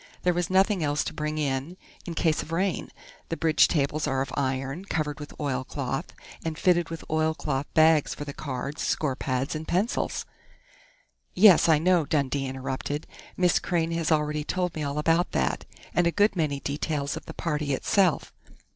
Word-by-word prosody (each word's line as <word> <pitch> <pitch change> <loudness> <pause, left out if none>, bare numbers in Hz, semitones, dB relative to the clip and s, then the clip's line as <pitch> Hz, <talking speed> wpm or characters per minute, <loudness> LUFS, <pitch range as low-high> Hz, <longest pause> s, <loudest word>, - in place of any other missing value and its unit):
There 180 - +3
was 175 0 -1
nothing 190 -1 +3
else 145 0 +1
to - - -5
bring 150 0 -3
in, 145 +4 -2 0.3
in 170 - -4
case 160 -2 +1
of 160 - -9
rain. 185 +2 -1 0.4
The 165 - -2
bridge 160 -2 +4
tables 150 0 0
are 135 0 +1
of 135 - -9
iron, 135 +5 -2
covered 155 -5 -2
with 150 - -10
oilcloth, 135 +1 -3 0.3
and 160 -1 -3
fitted 175 -1 +2
with 165 0 -6
oilcloth 155 -3 -1
bags 155 -1 +4
for 145 - -6
the 140 - -6
cards, 140 +1 -5
score 145 -4 0
pads, 130 +1 -2
and 155 0 -5
pencils 195 +7 0 0.6
" - - -33 0.3
"Yes, 190 -3 +7
I 160 - +6
know," 170 -1 +2
Dundee 140 -2 0
interrupted. 130 +3 -4 0.3
"Miss 180 -1 +3
Crain 170 -2 -1
has 165 -1 -1
already 150 -1 +1
told 180 +2 -1
me 155 - -4
all 145 0 -2
about 165 +3 +2
that, - - 0 0.3
and 175 -1 +3
a - - +2
good 205 +2 +3
many 150 -5 0
details 145 0 -2
of - - -8
the - - -8
party 150 -4 -1
itself.... 180 +2 +1
155 Hz, 180 wpm, -27 LUFS, 140-170 Hz, 0.6 s, Yes